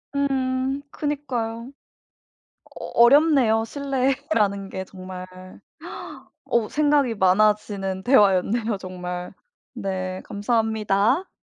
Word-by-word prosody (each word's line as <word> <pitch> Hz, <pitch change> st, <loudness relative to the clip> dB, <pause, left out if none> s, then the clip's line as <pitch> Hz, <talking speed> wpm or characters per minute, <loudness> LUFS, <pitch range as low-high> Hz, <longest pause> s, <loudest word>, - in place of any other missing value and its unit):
음. 265 Hz, 0 st, 0 dB
그니까요. 255 Hz, -5 st, -3 dB, 1.1 s
어 -, -, -6 dB, 0.2 s
어렵네요. 255 Hz, -4 st, +5 dB
신뢰라는 265 Hz, -6 st, -1 dB
게 190 Hz, -, -5 dB
정말. 185 Hz, -1 st, -9 dB, 1.2 s
어 230 Hz, -3 st, 0 dB
생각이 290 Hz, -5 st, +2 dB
많아지는 195 Hz, -1 st, +1 dB
대화였네요 215 Hz, -1 st, +3 dB
정말. 180 Hz, -1 st, -6 dB, 0.4 s
네. 185 Hz, -4 st, -4 dB
감사합니다. 220 Hz, -, 0 dB
225 Hz, 200 characters per minute, -23 LUFS, 195-270 Hz, 1.2 s, 어렵네요